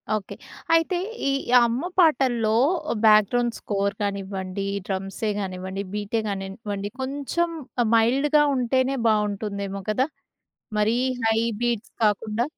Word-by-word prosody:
Okay. 205 -3 -5 0.4
అయితే 330 +2 +3 0.3
ఈ - - +2 0.3
అమ్మ 235 +2 -1 0.2
పాటల్లో, 250 -9 +3 0.5
బ్యాక్‌గ్రౌండ్ 220 +3 +4
స్కోర్ 200 -1 -1
కానివ్వండి, 195 -1 -3 0.2
డ్రమ్సే 195 +2 -2
కానివ్వండి, 190 0 -4
బీటే 210 +2 -1
గానివ్వండి, 200 +1 -4
కొంచెం 285 +6 -1 0.5
మైల్డ్‌గా 275 +6 +4
ఉంటేనే 260 +2 +1
బాగుంటుందేమో 200 -2 -1
కదా! 255 +6 +1 0.7
మరి 220 +3 +2 0.3
హై 225 0 +3 0.2
బీట్స్ 235 -2 -1
కాకుండా. 215 +2 +1
215 Hz, 100 wpm, -24 LUFS, 200-245 Hz, 0.7 s, బ్యాక్‌గ్రౌండ్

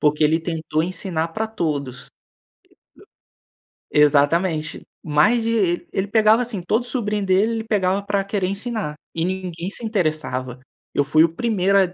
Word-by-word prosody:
Porque 150 +1 +2
ele 160 +2 +3
tentou 160 -2 -2
ensinar 170 -2 -2
pra 220 +7 -3
todos. 145 - -3 1.8
Exata 150 +1 +4
exatamente. 160 -3 -2 0.2
Mais 165 +10 +3
de 205 -7 0
ele 190 +1 -1
pegava 220 +2 +4
assim, 225 -6 -3
todo 220 +7 0
sobrinho 210 -5 -2
dele, 195 +4 +3
ele 225 - -2
pegava 200 -3 +1
pra 200 -1 0
querer 195 -2 -1
ensinar 200 -6 -3 0.2
e 165 - -1
ninguém 180 -1 -4
se 230 - -3
interessava. 155 - -2 0.3
Eu 145 - +2
fui 155 +3 +4
o 165 - +3
primeiro 200 -3 +1
a 185 -2 +1
185 Hz, 150 wpm, -21 LUFS, 155-210 Hz, 1.8 s, Exata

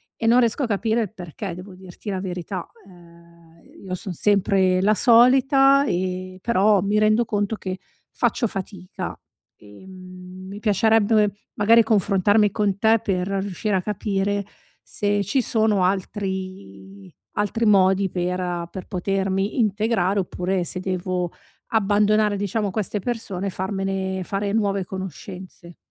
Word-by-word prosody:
E 225 - -2
non 240 +2 +6
riesco 235 +4 +1
a - - 0
capire 220 +2 0
il 210 - -3
perché, 180 -1 -7
devo 185 +2 -10
dirti 185 +2 -10
la 190 - -2
verità. 180 -1 -5 0.2
Ehm, 170 -2 -19 0.2
io 185 -1 -3
son 185 0 -6
sempre 190 -1 +2
la 210 +3 +4
solita, 270 +4 +5
ehm, 185 -3 -3
però 205 -1 +3
mi 205 +3 +1
rendo 215 +2 +3
conto 205 -1 -1
che 185 -3 -6 0.3
faccio 240 - 0
fatica. 190 -2 -7 0.4
Ehm, 185 - -12
mi 200 +1 -8
piacerebbe, 215 0 +3 0.2
magari, 225 +3 +5
confrontarmi 205 0 +2
con 200 -2 0
te 220 +2 +3
per 185 -2 -1
riuscire 195 +1 -2
a 185 - +1
capire 200 0 -2 0.4
se 205 0 -1
ci 235 +7 +1
sono 215 -4 +1
altri 185 - -4 0.2
altri 210 +3 0
modi 195 -1 +4
per 180 +1 -2
uhm, 175 -1 -3
per 190 - -7
potermi 195 +2 -1
integrare, 210 -3 +1
oppure 185 0 -2
se 180 - -3
devo 185 -1 -2 0.4
abbandonare, 210 0 +3
diciamo, 205 +1 -1
queste 210 +1 -2
persone 200 -4 -4
e - - 0
farmene 190 0 -3
fare 200 +2 -2
nuove 200 -3 0
conoscenze. 185 -2 -9
195 Hz, 135 wpm, -23 LUFS, 185-210 Hz, 0.4 s, non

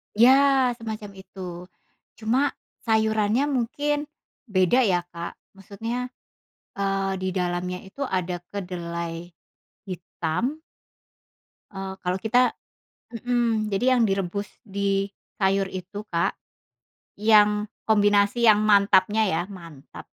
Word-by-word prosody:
Iya, 240 +4 +7 0.5
semacam 215 -2 -6
itu. 190 0 -14 0.8
Cuma 250 +6 +1 0.3
sayurannya 220 +1 +2
mungkin 290 +4 -1 0.4
beda 190 +5 +3
ya, 175 -2 +2
Kak, 170 0 -6 0.2
maksudnya, 225 +6 -4 0.7
eee, 195 -1 0
didalamnya 180 -1 -2
itu 275 +9 -7
ada 185 -6 -1 0.2
kedelai 170 -3 -5 0.5
hitam 185 - -3 1.1
eee, 195 -1 -5
kalau 180 +1 0
kita 245 +3 +2 0.6
mmm, 230 -3 0
jadi 250 +6 +3
yang 240 - +3
direbus 195 +1 -2 0.2
di 200 -2 -1 0.3
sayur 195 0 +2
itu, 190 +3 -6
Kak, 170 0 +1 0.8
yang 210 -1 +4 0.2
kombinasi 205 +2 +3
yang 210 -1 +6
mantapnya 205 +1 +4
ya, 165 -3 0
mantap. 170 -8 -11
200 Hz, 100 wpm, -25 LUFS, 185-220 Hz, 1.1 s, Iya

